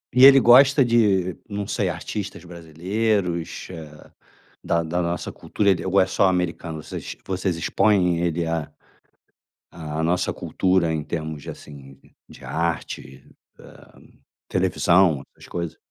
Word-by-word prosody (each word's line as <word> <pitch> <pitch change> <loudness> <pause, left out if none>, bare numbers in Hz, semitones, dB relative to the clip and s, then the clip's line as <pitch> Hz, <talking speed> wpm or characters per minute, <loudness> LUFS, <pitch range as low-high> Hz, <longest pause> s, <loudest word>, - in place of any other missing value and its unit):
E 130 +1 +8
ele 135 0 +9
gosta 135 +2 +6
de 100 -7 +2
não 100 0 -4
sei, - - -1
artistas 100 -4 -6
brasileiros, 90 +2 -2
eh, 80 -3 -10 0.7
da 85 0 0
da 85 +2 -2
nossa 85 0 -3
cultura, 100 -1 -1
ele 95 -2 +1
ou 95 +1 +2
é 95 - +3
só 95 +1 +2
americano, 85 -3 -2
vocês - - -7
vocês 95 -2 -2
expõe 90 -2 +2
ele 85 -1 -1
à 80 -2 -2 1.0
à 80 -1 -5
nossa 85 +2 +1
cultura 90 -3 0
em 75 - -2
termos 80 -2 -5
de - - -9
assim 70 -2 -12 0.3
de - - -15
arte, 80 -5 -4 0.3
eh, - - -17 0.5
televisão, 85 -6 +2
essas - - -15
coisas? 85 -2 -5
85 Hz, 135 wpm, -23 LUFS, 80-100 Hz, 1.0 s, ele